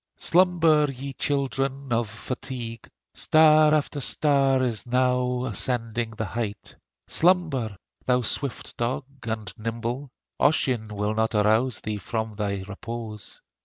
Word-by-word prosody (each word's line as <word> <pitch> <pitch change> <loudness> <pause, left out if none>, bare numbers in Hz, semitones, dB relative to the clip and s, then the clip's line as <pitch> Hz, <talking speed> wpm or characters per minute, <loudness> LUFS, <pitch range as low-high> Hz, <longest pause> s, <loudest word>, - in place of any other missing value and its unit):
Slumber, 165 -4 +4
ye 135 +1 -7
children 135 -1 -1
of 115 -2 0
fatigue; 115 +1 -6 0.2
Star 155 -1 +5
after 150 -1 0
star 135 -2 +2
is 120 -2 -2
now 125 0 +1
ascending 115 0 -1
the 110 - -2
height. 110 -1 -4 0.3
Slumber! 160 - +2 0.3
thou 125 -1 +3
swift 135 +2 -2
dog 120 +3 -1 0.2
and 110 -4 -4
nimble 115 +5 -3 0.3
Ossian 130 -7 +2
will 105 +1 -2 0.2
arouse 110 +3 +2
thee 110 -1 -3
not - - -10
from 110 +2 -3
thy 100 -2 -2
repose. 110 0 -7
125 Hz, 120 wpm, -25 LUFS, 110-140 Hz, 0.3 s, Star